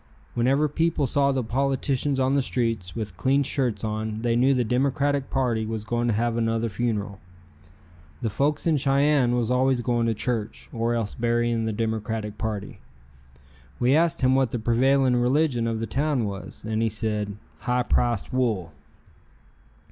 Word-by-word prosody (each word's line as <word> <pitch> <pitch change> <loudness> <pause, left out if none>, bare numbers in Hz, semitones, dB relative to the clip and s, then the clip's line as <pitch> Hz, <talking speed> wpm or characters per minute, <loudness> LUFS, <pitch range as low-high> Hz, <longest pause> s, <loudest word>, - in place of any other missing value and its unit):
Whenever 135 +5 +2
people 155 0 0
saw 140 +1 +2
the 130 -2 -1
politicians 135 +2 0
on 130 0 +2
the 140 0 +3
streets 115 -8 -2
with 105 -5 -5
clean 140 +2 +2
shirts 130 -5 -1
on 110 0 -2
they 120 -1 +1
knew 130 +3 +4
the 125 -2 +2
Democratic 135 +3 0
party 125 -4 0
was 110 -1 -4
going 120 +2 -1
to 115 - +2
have 115 +1 0
another 115 0 0
funeral. 105 -2 -2 1.0
The 115 - +1
folks 145 +7 0
in 160 -3 +3
Cheyenne 140 -2 +3
was 120 -1 0
always 130 0 +2
going 120 -1 0
to 115 - 0
church, 105 - -3
or 115 +1 0
else 115 -3 -2
burying 120 -1 0
the 110 - -1
Democratic 110 -1 -3
party. 105 -3 -4 1.0
We 125 +3 +3
asked 165 0 +2
him 130 0 +4
what 130 -2 +3
the 120 - -3
prevailing 125 +3 +3
religion 125 -1 +2
of 115 -1 -1
the 115 - -2
town 140 -2 0
was, 100 +1 -7
and 110 0 -1
he 115 - +2
said, 105 -1 -2 0.2
"High 125 0 0
priced 120 -2 0
wool." 110 -10 0
120 Hz, 165 wpm, -25 LUFS, 110-135 Hz, 1.0 s, knew